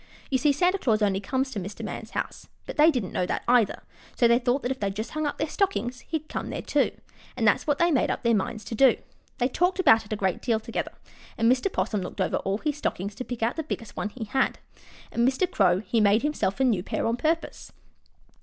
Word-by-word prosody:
You 260 - +2
see, 295 +1 +4
Santa 360 +7 +2
Claus 220 -7 +2
only 195 -2 +2
comes 265 +6 -1
to 220 - -3
Mr. 195 +2 -6
Man's - - -6
house, - - -5 0.2
but - - -6
they 305 +1 +6
didn't 245 - -1
know 180 - 0
that, - - -2
either, 240 -4 +3 0.3
so 240 - +4
they 235 +1 +4
thought 250 +1 0
if 260 +1 -2
they 200 - 0
just 215 +3 -5
hung 310 -1 -1
up 290 - -3
their 310 - -1
stockings 295 - -1
he'd 315 -2 -3
come - - -4
there, - - -4
too, - - +2 0.5
and - - +2
that's - - +3
what 290 -1 +2
they 340 +2 +3
made 275 - +2
up - - -2
their 235 -1 +3
minds 215 +1 -1
to - - -6
do. 255 +2 +5 0.4
They 245 - +2
talked 355 +8 +1
about 225 -11 +6
it 210 - -16
a - - +1
great 190 -3 -1
deal 230 -3 +1
together, 225 +1 -4 0.4
and 230 +1 +4
Mr. 260 +10 +1
'Possum 210 - -1
looked 185 - -7
over 185 - +1
all 195 +1 -1
his 295 +5 -2
stockings 200 -8 -3
to 225 - -6
pick 245 -3 -5
out 235 +6 0
the - - 0
biggest 230 -7 -6
one 205 - -2
he 230 +2 -7
had, 265 +5 0 0.5
and 235 +1 +2
Mr. 270 +8 +2
Crow 185 - +2
he 225 +1 0
made 210 +3 +4
himself 295 -8 -1
a - - +3
new 225 -8 +2
pair - - -3
on 230 - +1
purpose. 320 +6 -2
240 Hz, 245 wpm, -26 LUFS, 210-285 Hz, 0.5 s, they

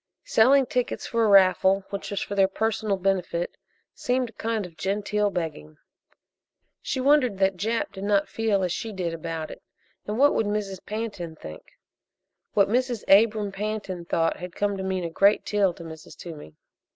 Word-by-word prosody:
Selling 265 +4 +5
tickets 250 0 -2
for 230 -1 0
a - - +4
raffle 195 0 +5
which 200 - -5
was 200 - -2
for - - -4
their 195 -1 +4
personal 215 0 -1
benefit 180 -2 -1 0.4
seemed 250 -1 -1
a - - -35
kind 220 -1 -2
of 170 -2 -12
genteel 205 +4 0
begging. 160 - -5 1.0
She 265 - -3
wondered 260 -6 +3
that 190 0 +2
Jap 220 +6 -1
did 195 0 -8
not 200 -1 +2
feel 215 -4 0
as 180 - 0
she 225 +5 -3
did 180 -4 -3
about 165 -1 -5
it. - - -11 0.5
And 210 +1 -2
what 285 +3 +5
would 220 - +1
Mrs. 205 -3 -3
Pantin 205 -7 -5
think? 80 - -12 0.8
What 200 -1 +5
Mrs. 245 0 0
Abram 210 -1 +2
Pantin 195 -3 -4
thought 165 -1 0
had 180 -1 -8
come 205 0 0
to 190 - -5
mean 190 -1 -2
a 170 - -2
great 200 +5 +3
deal 205 -3 +2
to 170 - -10
Mrs. 160 -1 -11
Toomey. 150 - -10
200 Hz, 175 wpm, -25 LUFS, 180-220 Hz, 1.0 s, Selling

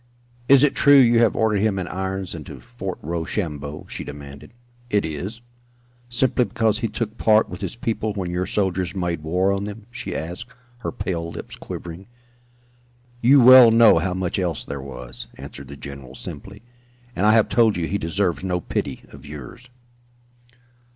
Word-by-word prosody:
"Is 140 0 +7
it 150 - +4
true 145 -1 +6
you 120 -3 +6
have 115 -2 +3
ordered 110 -2 +2
him 105 -1 +1
in 95 - -3
irons 95 0 -4
and 80 -3 -7
to - - -9
Fort 115 -6 -6
Rochambeau?" 80 -3 -4
she - - -5
demanded. 70 -1 -10 0.4
"It 105 -4 +1
is." 90 +9 -5 0.7
"Simply 125 +1 +2
because 110 -2 0
he 115 - -1
took 110 +1 -5
part 110 0 +4
with - - -8
his 95 +2 -4
people 110 -2 -2
when 90 -3 -3
your 90 +1 -2
soldiers 95 -3 -1
made 90 -3 -2
war 90 +5 +1
on 100 +1 -1
them?" 105 +1 -8
she 120 0 -6
asked, 90 +9 -5 0.3
her - - -4
pale 85 -5 -3
lips - - -8
quivering. 85 +3 -8 1.1
"You 135 +3 +6
well 125 -1 +10
know 115 -6 +6
how 90 +2 -2
much 95 0 -2
else 85 -4 -2
there 70 -1 -5
was," 65 -2 -9
answered 70 - -10
the 70 - -10
general, 70 -1 -9
simply. - - -9 0.5
"And 100 +4 +2
I 110 - +6
have 110 -1 +4
told 115 -4 +3
you 85 - -1
he 100 +4 -2
deserves 90 +2 -1
no 90 -2 -1
pity - - -4
of 70 -2 -14
yours." 75 - -10
95 Hz, 175 wpm, -22 LUFS, 85-110 Hz, 1.1 s, well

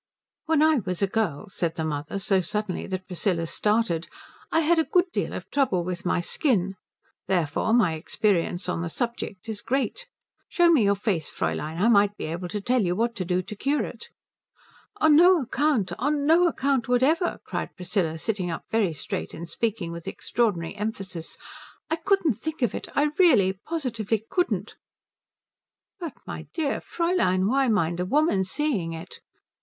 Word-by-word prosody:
"When 315 -1 +4
I 315 -1 +5
was 185 -2 -3
a - - +6
girl," 200 -4 -1
said 170 -3 -2
the 160 - -2
mother, 150 +4 -3
so 195 -1 +2
suddenly 205 +1 -3
that 185 -1 -4
Priscilla 180 -2 -1
started, 210 -3 0 0.4
"I 325 - +3
had 330 +1 +3
a - - +4
good 360 +2 +2
deal - - -1
of - - -6
trouble 250 -11 +2
with 180 0 -4
my 175 - +1
skin. 195 - 0 0.5
Therefore 175 +1 0
my 220 -8 +4
experience 175 +2 0
on 180 -2 -1
the 170 - -3
subject 235 -2 -4
is 220 -2 -5
great. 275 - -2 0.4
Show 345 -2 +4
me 270 -10 +5
your 200 0 +4
face, 195 -6 -1
Fräulein 160 +2 -3
I 205 - +3
might 205 -2 +4
be - - -4
able 170 +3 -4
to 205 +4 -3
tell 245 +4 +1
you 180 -3 0
what 235 +3 0
to 185 - -1
do 180 +1 0
to 210 - -8
cure 280 +8 0
it." 470 - -8 0.9
"Oh, - - +2
on 310 -1 +7
no 355 +2 +7
account 260 - 0
on 290 +2 0
no 335 +3 +5
account 275 -6 0
whatever," 280 +8 +2
cried - - -4
Priscilla, 180 -3 -1
sitting 190 0 -2
up 165 - -5
very 210 -7 +2
straight 145 - -5
and 170 +1 -7
speaking 205 -4 -2
with 170 0 -8
extraordinary 200 -8 -1
emphasis. 195 -5 -4 0.5
"I - - +3
couldn't 380 -3 +2
think 310 +6 -5
of 240 - +1
it - - -5
I 295 +1 +3
really 205 - +5
positively 225 - -3
couldn't." 360 -1 -1 1.2
"But 335 -5 -5
my - - -7
dear 305 -4 0
Fräulein, 335 - +1
why 270 +3 +2
mind 175 -6 +1
a 180 - 0
woman 280 - +3
seeing 190 - -1
it?" 165 +2 -9
210 Hz, 175 wpm, -26 LUFS, 180-285 Hz, 1.2 s, on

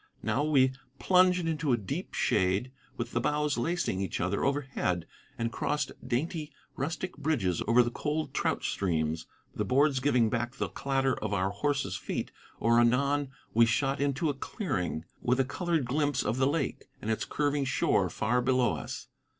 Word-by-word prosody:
Now 110 +6 +1
we, 135 -4 +4 0.3
plunged 180 0 +4
into 155 -3 0
a - - +3
deep 100 -5 -5
shade 95 +7 +1 0.3
with 120 0 -3
the 120 - 0
boughs 150 +2 +1
lacing 160 - -1
each 95 - -2
other 95 +3 0
overhead, 135 - 0 0.3
and 115 0 -1
crossed 150 +2 -1
dainty, 150 +5 -2 0.2
rustic 165 +6 -3
bridges 135 - 0
over 120 +2 +6
the 120 - -2
cold 150 +4 -2
trout - - 0
streams, 80 -4 -1 0.3
the - - -1
boards 140 +1 +3
giving 125 -4 +3
back 120 +3 -2
the - - -2
clatter 135 -1 0
of 105 -1 -2
our 95 0 +1
horses' 140 +7 -1
feet: - - -4 0.3
or 115 +1 +4
anon 140 +4 +2 0.2
we 115 +1 +6
shot 135 +5 +1
into 140 +3 +1
a 145 - +1
clearing, 100 - -3 0.2
with 125 +2 +1
a 135 - +3
colored 165 0 -1
glimpse 145 +3 +1
of 115 - -1
the 130 0 +3
lake 145 -2 -1
and 110 - -2
its 110 - -1
curving 145 -1 0
shore 130 - +2
far 120 +3 +1
below 125 -1 +2
us. - - -6
130 Hz, 170 wpm, -30 LUFS, 115-145 Hz, 0.3 s, over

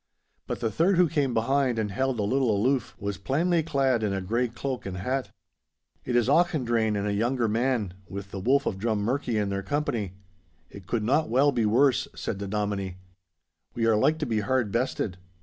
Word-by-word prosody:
But - - -4
the 115 -2 0
third, 175 - +2
who 180 -1 +5
came 145 -4 0
behind 125 +2 +1
and 105 -2 -1
held 130 +4 0
a - - +1
little 130 +4 +1
aloof, 115 +4 +1
was 100 -1 -4
plainly 165 - +1
clad 135 -6 +1
in 105 -2 0
a 95 - -1
grey 115 +7 0
cloak 125 0 -5
and 95 -1 -5
hat. 130 +8 -2 0.8
'It 125 - -1
is 120 -1 +3
Auchendrayne 125 -9 +2
and 100 - -2
a 105 - 0
younger 120 +3 +1
man, 115 -3 0 0.2
with 100 +1 -7
the 100 - -5
Wolf 135 +8 +2
of 95 - -2
Drummurchie 115 +3 0
in 105 -1 0
their 100 0 -2
company; 110 - -2 0.6
it 100 -3 -12
could 115 -3 -1
not 145 +8 +2
well 135 +4 +4
be 115 -5 +1
worse,' 130 +5 +3
said 95 - -4
the 100 - -4
Dominie. 100 -2 -2 0.8
'We 115 - 0
are 115 -1 +4
like 150 +9 +3
to 155 - -2
be 115 -5 0
hard 115 0 0
bested. 115 -5 -1
115 Hz, 200 wpm, -27 LUFS, 105-135 Hz, 0.8 s, who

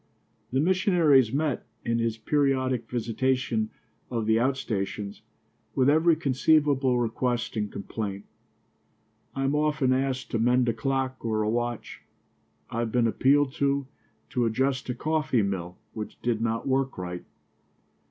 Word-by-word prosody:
The 130 - +1
missionary 175 -3 +4
is 115 -4 +1
met, 145 0 0 0.2
in 115 0 +1
his 115 -1 0
periodic 130 -2 0
visitation 120 -1 0 0.4
of 115 -3 -2
the 110 0 +3
outstations, 105 -6 -2 0.5
with 135 +1 +4
every 160 +2 +4
conceivable 140 -3 +2
request 120 0 -1
and 105 -2 -2
complaint. 100 -1 -5 1.1
I 135 - -1
am 135 +1 +1
often 150 -3 +2
asked 130 -1 -1
to 115 - 0
mend 125 +2 +3
a - - +1
clock 135 -1 -2
or 110 -2 0
a 105 - 0
watch. 120 0 -3 0.7
I 115 - -2
have 115 -1 -1
been 120 0 +2
appealed 135 +4 +3
to 140 0 +1 0.5
to 125 -2 +1
adjust 130 +3 0
a 125 - -1
coffee 150 -5 +1
mill 90 -3 -3 0.2
which 110 -1 -7
did 115 -2 0
not 115 +1 -1
work 135 0 0
right. 90 -1 -5
125 Hz, 140 wpm, -27 LUFS, 115-135 Hz, 1.1 s, missionary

